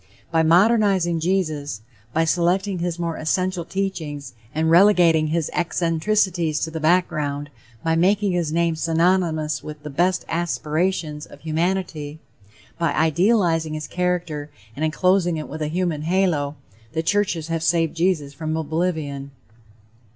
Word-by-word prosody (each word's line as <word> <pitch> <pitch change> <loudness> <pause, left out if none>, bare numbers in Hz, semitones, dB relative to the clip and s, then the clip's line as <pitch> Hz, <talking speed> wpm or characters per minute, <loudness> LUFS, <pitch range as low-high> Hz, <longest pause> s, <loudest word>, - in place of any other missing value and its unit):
By 165 -1 +3
modernizing 185 0 +3
Jesus, 155 - -1 0.3
by 160 +5 +1
selecting 180 +3 +1
his 175 0 -2
more 170 -1 -3
essential 180 +2 -1
teachings, 160 -8 -4 0.2
and 160 +3 0
relegating 170 -4 +5
his 160 0 -1
eccentricities 170 -1 0
to 160 - -2
the 160 - -4
background, 150 -4 0 0.3
by 165 0 +1
making 200 +4 +2
his 170 -4 -1
name 170 0 +1
synonymous 165 -2 +1
with 150 -1 -9
the 150 - -6
best 180 +5 +1
aspirations 160 -1 -1
of - - -15
humanity, 160 -2 -2 0.6
by 165 -3 +1
idealizing 165 -1 +2
his 155 0 -4
character 175 -4 -2 0.3
and 150 - -4
enclosing 175 +2 +2
it 155 - -5
with 155 +2 -7
a 155 - 0
human 170 -1 -1
halo, 160 -4 +1 0.4
the 160 - -1
churches 170 -3 0
have 165 -1 -1
saved 165 -1 +1
Jesus 165 -5 0
from 155 +1 -3
oblivion. 155 -3 -2
165 Hz, 135 wpm, -22 LUFS, 155-180 Hz, 0.6 s, relegating